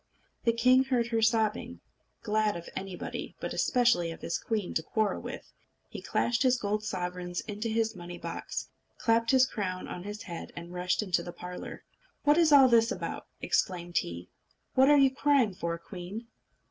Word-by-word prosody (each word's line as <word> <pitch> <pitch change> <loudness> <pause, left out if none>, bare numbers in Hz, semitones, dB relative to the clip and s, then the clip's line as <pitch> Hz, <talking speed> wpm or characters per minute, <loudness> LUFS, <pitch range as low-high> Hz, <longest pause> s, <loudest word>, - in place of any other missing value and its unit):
The 230 - +5
king 255 +3 +4
heard 245 -3 +1
her 225 -1 +1
sobbing. 220 -1 +1 0.4
Glad 215 0 +1
of 170 - -9
anybody, 190 -1 -5
but - - -4
especially 235 -9 +3
of 165 - -8
his 170 - -2
queen, 215 -5 -2
to - - +1
quarrel 215 +5 -1
with, - - -8 0.4
he - - -7
clashed 235 0 0
his 255 -1 +4
gold 210 -1 -1
sovereigns 180 -3 -3
into 215 +1 -4
his 225 0 0
money 175 -1 -8
box, - - -5 0.3
clapped 230 0 +2
his 260 0 +6
crown 185 -7 -4
on 175 - -6
his 210 +3 -7
head, 170 -2 -7
and 170 +1 -8
rushed 180 +3 0
into 185 -4 +1
the 175 - -7
parlour. 180 +1 -8 0.4
"What 295 +3 +5
is 325 -3 +5
all 275 -2 +9
this 230 -1 +4
about?" - - -4
exclaimed 175 -2 0
he. 85 +1 -6 0.5
"What 265 +2 +5
are 295 - +7
you 270 -1 +5
crying 275 -7 +3
for, 170 -2 -3
queen?" 185 +6 -8
215 Hz, 175 wpm, -29 LUFS, 180-240 Hz, 0.5 s, all